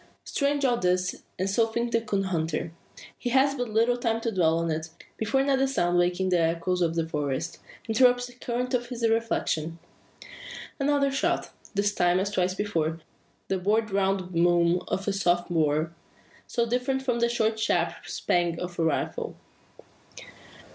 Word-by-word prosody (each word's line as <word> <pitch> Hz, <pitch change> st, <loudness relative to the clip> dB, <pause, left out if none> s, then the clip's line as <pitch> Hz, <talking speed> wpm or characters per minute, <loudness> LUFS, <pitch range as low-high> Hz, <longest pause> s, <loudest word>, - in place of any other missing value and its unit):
Strange 285 Hz, 0 st, 0 dB
all 245 Hz, -2 st, +3 dB
this; 180 Hz, -2 st, 0 dB, 0.2 s
and 185 Hz, -, -1 dB
so 225 Hz, +4 st, +2 dB
thinks 235 Hz, +1 st, -2 dB
the 230 Hz, -, +3 dB
coon 205 Hz, -3 st, -1 dB
hunter. 165 Hz, -3 st, -2 dB, 0.5 s
He 245 Hz, -, -2 dB
has 270 Hz, +3 st, +4 dB
but 245 Hz, -4 st, -3 dB
little 230 Hz, +3 st, +2 dB
time 230 Hz, -2 st, 0 dB
to 230 Hz, -, -1 dB
dwell 165 Hz, -5 st, +2 dB
on 165 Hz, 0 st, 0 dB
it, 160 Hz, +1 st, -3 dB, 0.3 s
before 220 Hz, +5 st, +1 dB
another 270 Hz, -1 st, +2 dB
sound 175 Hz, -9 st, +1 dB
waking 180 Hz, +1 st, +1 dB
the 180 Hz, -1 st, +3 dB
echoes 170 Hz, +2 st, 0 dB
of 165 Hz, -1 st, +1 dB
the 165 Hz, -1 st, 0 dB
forest, 150 Hz, +1 st, -3 dB, 0.3 s
interrupts 245 Hz, +2 st, +4 dB
the 245 Hz, -, -11 dB
current 245 Hz, +1 st, -3 dB
of 245 Hz, -1 st, 0 dB
his 235 Hz, -2 st, -1 dB
reflections. 220 Hz, -8 st, 0 dB, 1.0 s
Another 280 Hz, 0 st, +2 dB
shot! 275 Hz, -, 0 dB, 0.2 s
This 205 Hz, +1 st, +1 dB
time, 175 Hz, -1 st, +3 dB
as 200 Hz, +1 st, -1 dB
twice 185 Hz, -2 st, 0 dB
before, 165 Hz, -6 st, -1 dB, 0.5 s
the 190 Hz, -, 0 dB
broad 215 Hz, +3 st, +1 dB
round 195 Hz, -1 st, 0 dB
boom 175 Hz, 0 st, +3 dB
of 195 Hz, +2 st, -2 dB
a 200 Hz, -, +1 dB
smooth 175 Hz, -3 st, +2 dB
bore, 155 Hz, 0 st, +1 dB, 0.5 s
so 235 Hz, -2 st, 0 dB
different 250 Hz, +3 st, -1 dB
from 245 Hz, -3 st, 0 dB
the 235 Hz, 0 st, +2 dB
short 220 Hz, -2 st, 0 dB
sharp 170 Hz, -5 st, +1 dB
"spang" 175 Hz, -1 st, 0 dB
of 180 Hz, -1 st, -6 dB
a -, -, +2 dB
rifle. 160 Hz, -3 st, -1 dB
195 Hz, 170 wpm, -27 LUFS, 175-240 Hz, 1.0 s, has